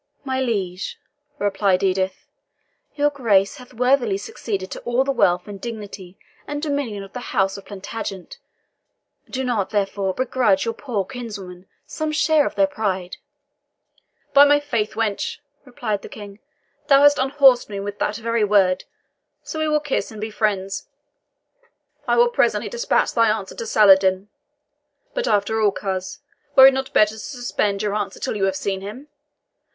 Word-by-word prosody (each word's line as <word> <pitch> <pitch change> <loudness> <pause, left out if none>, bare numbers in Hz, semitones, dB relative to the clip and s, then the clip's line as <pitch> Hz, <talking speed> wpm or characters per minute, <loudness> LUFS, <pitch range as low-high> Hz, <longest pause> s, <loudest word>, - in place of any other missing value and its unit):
"My 265 -1 -1
liege," 195 -7 -2 0.4
replied 195 -3 +1
Edith, 190 0 0 0.7
"your 290 0 +2
Grace 205 -8 +2
hath 250 0 -14
worthily 250 -4 +2
succeeded 195 -1 -5
to - - -5
all 240 +2 +1
the 275 - 0
wealth, 180 -8 +2 0.2
dignity, 205 -5 -8 0.3
and 290 0 -3
dominion 285 -9 -3
of 195 - -13
the 250 - -5 0.2
House 195 0 +2
of 200 - -10
Plantagenet 200 - -7 0.9
do 265 0 -3
not, 230 -6 -1
therefore, 195 -2 -1
begrudge 245 -7 +1
your 230 - -1
poor 225 -6 -3
kinswoman 195 -7 -8 0.2
some 310 0 -3
small 305 +1 +2
share 290 - +4
of - - -6
their 295 - +4
pride." 195 -10 -3 1.2
"By 285 0 +9
my 290 0 +5
faith, 235 -7 -2
wench," 220 -3 -2 0.4
said 215 -4 -1
the - - -10
King, 205 -1 -10 0.5
"thou 280 -1 +6
hast 290 0 +6
unhorsed 265 -2 +4
me 200 -1 -5
with 200 +1 -6
that 210 - -1
very 230 0 0
word, 195 -3 +3 0.6
so 315 - -6
we 315 - 0
will 300 0 +2
kiss 290 -2 -2
and 220 - -10
be 215 +1 -4
friends. 195 -3 -1 1.2
I - - +3
will 480 0 +5
presently 475 - +1
dispatch 480 0 0
thy 230 -2 +4
answer 215 -3 -2
to 230 - -6
Saladin. 190 -2 +4 0.8
But - - -2
after 210 +2 +1
all, 210 -2 +4
coz, 190 +4 -4 0.3
were 265 - +10
it 270 - +8
not 265 0 -3
better 215 0 +4
to 220 - -10
suspend 215 -5 -2
your 205 -1 -1
answer 205 -2 -3
till - - -3
you 195 -2 +1
have 190 -1 0
seen 195 0 -3
him? 215 +9 -8
215 Hz, 165 wpm, -22 LUFS, 195-265 Hz, 1.2 s, were